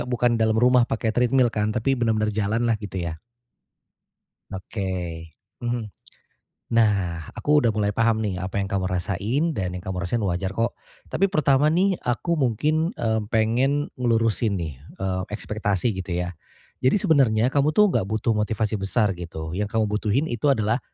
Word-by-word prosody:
bukan 120 -1 +1
dalam 110 0 +2
rumah 125 +1 +4
pakai 115 0 -1
treadmill 125 +1 +3
kan? 105 0 -1
Tapi 120 +4 +1
benar-benar 110 -2 +1
jalanlah 110 +2 0
gitu 100 -2 -7
ya. 80 -1 -5 1.3
Oke, 95 -4 -4 0.4
mhm, 120 -2 -2 0.8
nah 100 -8 +1
aku 150 0 +3
udah 115 -5 +1
mulai 105 -1 +1
paham 110 0 +1
nih 95 -3 -2
apa 95 +1 -5
yang 100 -1 -1
kamu 95 -1 0
rasain 100 - -1
dan 95 - -3
yang 90 - -7
kamu 95 -1 -4
rasain 105 +4 -1
wajar 95 +1 -2
kok, 115 +1 -1 0.3
tapi 195 - +2
pertama 145 -3 +3
nih 185 +4 +2
aku 155 +7 -1
mungkin, 155 - +1
eee, 110 -1 0
pengen 125 +6 +1
ngelurusin 115 -3 +1
nih, 80 -7 -5 0.2
eee, 95 -1 -2
ekspektasi 105 0 -1
gitu 95 -2 -4
ya, 90 0 -2 0.5
jadi 130 - +3
sebenarnya 135 - +3
kamu 145 +2 +2
tuh 210 -3 +5
enggak 95 - 0
butuh 110 +2 0
motivasi 110 -1 -1
besar 100 +1 +1
gitu 85 -3 -6
yang 100 +4 -2
kamu 110 -1 0
butuhin 110 +6 +1
itu 120 +5 -1
adalah, 115 -2 +2
110 Hz, 160 wpm, -24 LUFS, 95-125 Hz, 1.3 s, tuh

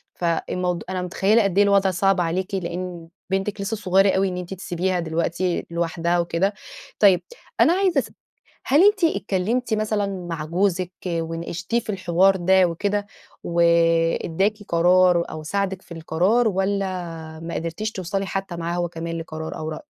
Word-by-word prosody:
فالموض 175 +1 -1
أنا 185 -1 -2
متخيلة 195 +5 +2
قد 195 -1 -1
إيه 205 - +7
الوضع 200 -1 +3
صعب 195 +1 +2
عليكِ، 180 +3 -2
لأن 175 -1 -5 0.2
بنتِك 195 +2 -2
لسه 220 +3 -2
صغيرة 195 -1 +3
أوي 195 +1 +2
إن 180 -1 -4
أنتِ 180 +1 -5
تسيبيها 180 0 -2
دلوقتي 170 +2 -1
لوحدها 170 +1 0
وكده. 175 +4 0 0.5
طيب، 190 -4 +5 0.4
أنا 335 - +6
عايزة 370 -6 +2
أس - - -5 0.6
هل 290 +6 +5
أنتِ 410 -2 +4
اتكلمتي 225 - 0
مثلًا 215 -1 0 0.2
مع 155 -2 -4
جوزِك 180 +1 0 0.2
وناقشتيه 170 +5 -2
في 230 - -12
الحوار 190 0 +3
ده 190 +1 +4
وكده 205 +4 -1 0.4
واداكِ 170 +2 +2
قرار 175 0 +4
أو 155 - -7
ساعدِك 190 +2 -2
في - - -24
القرار 180 +9 +1
والّا 195 0 0 0.6
ما 170 - -5
قدرتيش 170 +7 -3
توصلي 195 0 -3
حتى 195 -2 -4
معاه 170 +1 -3
هو 175 -1 -1
كمان 165 0 -5
لقرار 160 -1 -6
أو 155 - -4
رأي؟ 155 - -6
185 Hz, 155 wpm, -23 LUFS, 170-200 Hz, 0.6 s, إيه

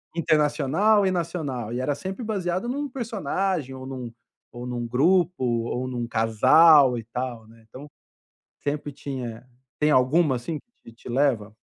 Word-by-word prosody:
internacional 160 +6 +2
e 190 - +2
nacional, 150 -10 -3
e 125 - -2
era 140 +3 -1
sempre 190 - -6
baseado 190 -1 -2
em 250 - -2
um 290 0 -3
personagem 195 - -2
ou 130 0 -8
em - - -7
um 125 -3 -6 0.4
ou 120 +1 -8
em - - -4
um 120 -1 -3
grupo 170 +5 +2
ou 120 +1 -1
em 130 - -6
um 120 -1 -3
casal 130 +5 +5
e 115 - -5
tal, 120 -2 -5
né, 115 0 -19
então, 140 +6 -11 0.7
sempre 145 0 -3
tinha 130 -5 -7 0.3
tem 150 0 +2
alguma, 135 +1 +3
assim, 150 +6 -4 0.3
que 115 - -13
te 115 - -13
leva? 120 -5 0
135 Hz, 170 wpm, -25 LUFS, 120-170 Hz, 0.7 s, casal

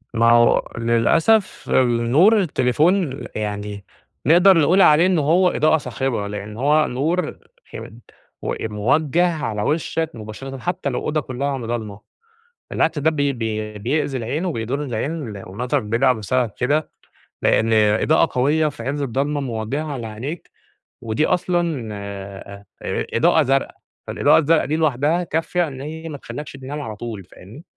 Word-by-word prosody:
ما 115 +1 +4
هو 120 0 +4
للأسف 155 - +2 0.4
نور 185 - +5
التليفون 155 0 +1
يعني 105 -1 -4 0.4
نقدَر 175 +6 +6
نقول 170 +5 +4
عليه 155 0 +6
إن 185 -3 +2
هو 170 +5 +3
إضاءة 155 -1 +3
صاخبة، 130 -7 -3
لأن 105 +1 -7
هو 150 +4 +3
نور 155 +6 -1 0.4
م - - -7 0.9
موجَّه 155 +10 +2
على 105 -6 -2
وشَّك 160 +4 -1
مباشرةً، 115 +5 -8
حتى 165 0 -3
لو 125 - -2
أوضة 155 0 -1
كلها 135 +1 -3
ضلْمة، 115 -4 -5 0.7
بالعكس 160 -1 0
ده 150 +2 +3
بي 145 -2 0
بي 110 -3 -4
بيأذي 135 +5 -1
العين 130 +9 -3
وبيضُر 135 -3 -2
العين 130 +2 -3 0.3
والنظر 120 +9 -2
بيضعف 120 +3 +1
بسبب 115 +3 -1
كده، 145 +5 0 0.5
لأن 115 +1 +2
إضاءة 110 +10 +3
قوية 150 +5 +2
في 145 -5 -9
عز 140 +4 -3
الضلمة 140 +3 -1
موجهة 135 +4 -3
على 120 -5 -5
عينيك، 125 +10 -7 0.5
ودي 115 +7 0
أصلًا 170 -9 -1
آآ، 100 0 -8 0.5
إضاءة 160 +4 +4
زرقا، 135 0 0 0.3
فالإضاءة - - +3
الزرقا 160 +1 +2
دي 155 - -1
لوحدها 155 +2 +1
كافِيَة 165 +1 -1
إن 135 -3 -8
هي 160 +3 -7
ما 145 - -6
تخلِّكش 140 +3 -8
تنام 140 +2 -6
على 110 -6 -6
طول 110 -2 -7
فاهمني؟ 105 - -14
135 Hz, 140 wpm, -21 LUFS, 115-155 Hz, 0.9 s, نقدَر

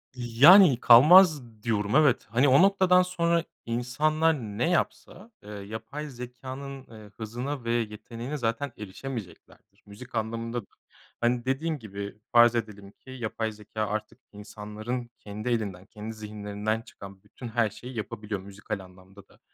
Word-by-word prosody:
yani, 130 - +7
kalmaz 155 +6 +8 0.2
diyorum 105 0 0
evet, 150 -5 +4
hani, 125 +6 +3
o 135 +5 +6
noktadan 190 -2 +5
sonra 170 -2 0 0.2
insanlar 155 +7 +1
ne 115 +4 -2
yapsa, 185 +4 -2
eee, 105 - -12
yapay 110 +9 -7
zekânın, 130 +2 -8
ııı, 110 -2 -13
hızına 120 +5 -5
ve 115 - -2
yeteneğine 115 +4 -4
zaten 115 +3 -2
erişemeyeceklerdir. 105 -2 -9
Müzik 115 +5 -12
anlamında 115 +2 -3
da, - - -21 0.6
hani, 120 +1 +1
dediğim 150 +3 -1
gibi 100 -1 -7
farz 120 -1 +6
edelim 105 -3 -5
ki, 130 - -20
yapay 115 -3 -3
zekâ 105 0 -5
artık 110 +1 -5
insanların 105 +4 -6
kendi 105 +3 -6
elinden, 100 -6 -2
kendi 110 +1 -8
zihinlerinden 105 +1 -4
çıkan 100 -3 -13
bütün 125 - -10
her 115 -1 +1
şeyi 125 +3 -10
yapabiliyor 105 -2 -5
müzikal 100 +1 -6
anlamda 95 +1 -16
da, - - -24
115 Hz, 140 wpm, -27 LUFS, 105-135 Hz, 0.6 s, kalmaz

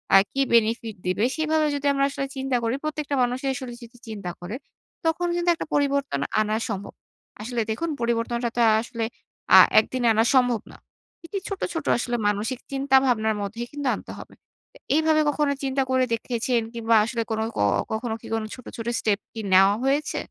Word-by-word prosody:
আ - - +11
কি 275 - 0
বেনিফিট 230 -1 +2
দিবে? 185 +4 0
সেভাবে 315 0 +1
যদি 285 0 -4
আমরা 275 0 +2
আসলে 275 0 -3
চিন্তা 265 -1 -1
করি, 230 +2 0
প্রত্যেকটা 300 -2 -2
মানুষি 250 +2 -2
আসলে 255 -1 -6
যদি 235 +1 -13
চিন্তা 205 -5 -5
করে, 180 +6 -6 0.5
তখন 325 +2 +1
কিন্তু 345 0 0
একটা - - -6
পরিবর্তন 280 - +1 0.2
আনা 215 0 +1
সম্ভব। 200 -1 -5 0.5
আসলে 235 +1 -2
দেখুন, 330 +10 -2
পরিবর্তনটা 235 0 0
তো - - -1
আ - - +5
আসলে 230 -1 -5 0.5
আ - - +12 0.2
একদিনে 255 -2 -1
আনা 220 +1 +3
সম্ভব 245 -3 +3
না। - - -14 0.5
এটি 395 +4 -5
ছোট, 395 -1 -5
ছোট 325 - -4
আসলে 240 0 -2
মানসিক 215 +5 -1
চিন্তা 270 0 +1
ভাবনার 220 -3 +1
মধ্যেই 220 +4 -4
কিন্তু 290 -2 -4
আনতে - - -10
হবে। - - -11 0.4
এ - - -15 0.2
এইভাবে 315 0 +3
কখনো 290 -1 +1
চিন্তা 270 0 0
করে 260 0 +3
দেখেছেন? 235 +1 0
কিংবা 230 0 +1
আসলে 235 0 -2
কোনো 220 0 0
ক - - -2 0.3
কখনো 220 +1 -2
কি - - -11
কোন 225 -1 0
ছোট, 255 - -14
ছোট 230 0 -5
স্টেপ 205 -2 +1
কি 225 - -7
নেওয়া 195 +2 +6
হয়েছে? 280 +3 0
245 Hz, 185 wpm, -24 LUFS, 225-275 Hz, 0.5 s, আ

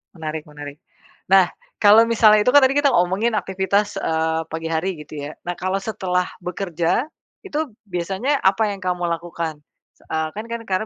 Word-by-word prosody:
Menarik 155 -2 -5
menarik. 145 -1 -10 0.5
Nah, 190 -2 +7 0.3
kalau 210 +2 +7
misalnya 215 -2 +5
itu 250 - +3
kan 285 - +8
tadi 265 +1 +3
kita 290 -1 +4
ngomongin 195 +2 +2
aktivitas, 200 +1 0
eee, 160 0 0
pagi 160 0 -4
hari 165 +2 -2
gitu 150 0 -10
ya. - - -7 0.2
Nah, 175 - -2
kalau 185 +1 -2
setelah 185 -3 -1 0.2
bekerja 175 - -1 0.4
itu 305 -5 -3 0.2
biasanya 190 +10 -1
apa 200 +3 +3
yang 190 - -12
kamu 180 -1 -1
lakukan? 170 -1 -3 0.6
Eee, 160 0 -1
kan 215 +2 -5
kan 235 0 -3
karena 190 +2 0
185 Hz, 165 wpm, -21 LUFS, 165-215 Hz, 0.6 s, kan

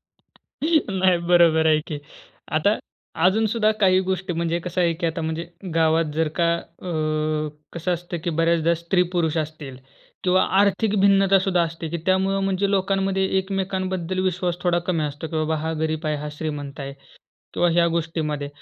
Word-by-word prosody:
नाही, 195 - -1
बरोबर 165 -2 +5
आहे 155 -1 +4
की. 150 -2 -4 0.5
आता 180 +8 +2 0.5
अजून 220 +4 +4
सुद्धा 215 -2 +3
काही 185 -1 +5
गोष्टी 185 -1 -2
म्हणजे 170 0 -1
कसं 180 +1 -3
आहे, 170 -1 +3
की 170 +1 -2
आता 165 +1 -2
म्हणजे 160 +1 -3 0.3
गावात 160 0 +3
जर 160 0 +1
का 170 0 +3
अ 180 +1 -9 0.8
कसं 170 +2 -2
असतं, 175 0 -6
की 170 - 0
बऱ्याचदा 165 +1 +2
स्त्री-पुरुष 170 -1 0
असतील 150 -4 -5 0.5
किंवा 185 +1 +4 0.2
आर्थिक 205 +1 +2
भिन्नतासुद्धा 195 -2 +4
असते, 165 -1 -4
की 170 - -3
त्यामुळं 190 +1 +2
म्हणजे 195 +1 0
लोकांमध्ये 195 0 +1
एकमेकांबद्दल 190 -2 -2
विश्वास 180 -1 -1
थोडा 175 -1 +2
कमी 165 -4 +1
असतो, 145 +2 -5
की 160 - -4
"बाबा, 155 0 0
हा 160 +1 -2
गरीब 160 0 -2
आहे, 150 -1 0
हा 150 +1 -5
श्रीमंत 150 -2 -5
आहे." 140 0 -5 0.6
किंवा 175 - +3
ह्या 170 0 +3
गोष्टीमध्ये. 155 -3 -2
170 Hz, 160 wpm, -23 LUFS, 160-190 Hz, 0.8 s, बरोबर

